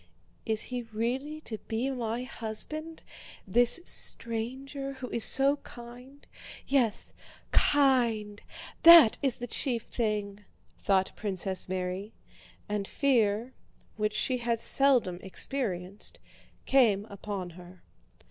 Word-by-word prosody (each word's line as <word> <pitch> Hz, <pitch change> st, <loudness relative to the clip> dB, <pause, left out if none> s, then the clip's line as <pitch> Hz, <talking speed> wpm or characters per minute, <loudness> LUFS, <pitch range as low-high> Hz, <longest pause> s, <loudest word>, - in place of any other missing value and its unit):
"Is 220 Hz, -1 st, +1 dB
he 250 Hz, -1 st, -4 dB
really 245 Hz, +7 st, -4 dB
to 220 Hz, -7 st, -6 dB
be 240 Hz, +4 st, -2 dB
my 240 Hz, -1 st, -3 dB
husband, 305 Hz, +7 st, -6 dB, 0.4 s
this 240 Hz, -, +2 dB
stranger 265 Hz, +5 st, -3 dB
who 265 Hz, -2 st, -8 dB
is 230 Hz, -, +2 dB
so 275 Hz, +2 st, +6 dB
kind—yes, 245 Hz, -1 st, -5 dB, 0.4 s
kind, 235 Hz, -7 st, +2 dB, 0.4 s
that 335 Hz, -9 st, +9 dB
is 270 Hz, -4 st, 0 dB
the 245 Hz, -, -5 dB
chief 240 Hz, -1 st, -2 dB
thing," 210 Hz, -3 st, -3 dB, 0.4 s
thought 190 Hz, -1 st, 0 dB
Princess 190 Hz, -2 st, -3 dB
Mary; 185 Hz, +3 st, -4 dB, 0.5 s
and 205 Hz, -1 st, -3 dB
fear, 235 Hz, -3 st, 0 dB, 0.4 s
which 210 Hz, -1 st, -1 dB
she 255 Hz, -1 st, 0 dB
had 235 Hz, -1 st, -1 dB
seldom 245 Hz, -10 st, +4 dB
experienced, 190 Hz, -3 st, -2 dB, 0.5 s
came 220 Hz, -7 st, +3 dB
upon 200 Hz, -3 st, -7 dB
her. 180 Hz, +1 st, -15 dB
230 Hz, 105 wpm, -28 LUFS, 205-265 Hz, 0.5 s, that